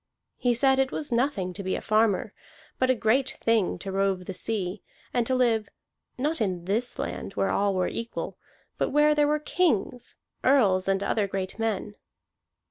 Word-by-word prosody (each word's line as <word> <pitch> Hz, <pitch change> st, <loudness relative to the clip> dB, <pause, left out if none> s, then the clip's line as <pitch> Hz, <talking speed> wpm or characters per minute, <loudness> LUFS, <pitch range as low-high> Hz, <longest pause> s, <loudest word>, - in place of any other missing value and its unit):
He 245 Hz, -1 st, +2 dB
said 265 Hz, +2 st, +3 dB
it 270 Hz, 0 st, +2 dB
was 295 Hz, -, -3 dB
nothing 235 Hz, -7 st, 0 dB
to 200 Hz, -, -5 dB
be 190 Hz, -1 st, -1 dB
a -, -, -2 dB
farmer, 215 Hz, -2 st, +1 dB, 0.5 s
but 255 Hz, -, +2 dB
a 260 Hz, -, +4 dB
great 245 Hz, +4 st, +1 dB
thing 225 Hz, -5 st, +1 dB
to 195 Hz, +2 st, -6 dB
rove 195 Hz, -1 st, 0 dB
the 190 Hz, -, -5 dB
sea, 195 Hz, -1 st, -3 dB, 0.3 s
and 240 Hz, -2 st, +1 dB
to 260 Hz, -, +2 dB
live, 230 Hz, -4 st, +2 dB, 0.5 s
not 295 Hz, +2 st, -1 dB
in 180 Hz, -5 st, -1 dB
this 225 Hz, +6 st, -1 dB
land -, -, -4 dB
where 195 Hz, -, 0 dB
all 200 Hz, -1 st, +1 dB
were 185 Hz, -1 st, +1 dB
equal, 230 Hz, 0 st, -5 dB, 0.4 s
but -, -, +1 dB
where 295 Hz, +1 st, +4 dB
there 295 Hz, -1 st, +3 dB
were 300 Hz, +1 st, +2 dB
kings, 295 Hz, -, -1 dB, 0.3 s
earls, 200 Hz, -9 st, +4 dB
and 195 Hz, 0 st, +1 dB
other 205 Hz, 0 st, 0 dB
great 190 Hz, +1 st, -4 dB
men. 220 Hz, -2 st, -2 dB
225 Hz, 180 wpm, -27 LUFS, 195-260 Hz, 0.5 s, a